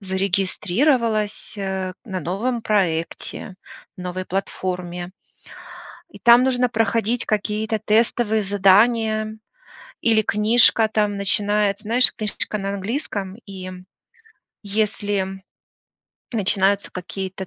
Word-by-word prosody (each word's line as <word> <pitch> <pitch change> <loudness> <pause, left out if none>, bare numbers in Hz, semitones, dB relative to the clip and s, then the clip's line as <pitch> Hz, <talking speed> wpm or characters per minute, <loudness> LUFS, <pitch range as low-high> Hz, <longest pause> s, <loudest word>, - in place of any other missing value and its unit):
зарегистрировалась, 205 - 0
э, 190 -1 -3
на 190 -3 -4
новом 225 - -2
проекте, 180 -2 -1 0.4
новой 180 +1 -4
платформе, 180 -2 -4 1.0
и - - -13
там 240 +1 +7
нужно 250 -1 +2
проходить 225 +1 0
какие-то 215 +1 -1
тестовые 220 0 +2
задания. 215 +3 +3 0.6
Или 225 -2 +4
книжка 220 +1 +4
там 210 -2 +1
начинается, 205 +1 +1
знаешь, 240 +4 +3
книжка 210 0 -3
на 195 -1 -3
английском, 200 -2 -4
и 185 -2 -8 0.9
если 200 -2 -2 0.9
начинаются 200 -2 +1
какие-то 190 +1 -6
205 Hz, 90 wpm, -22 LUFS, 190-220 Hz, 1.0 s, там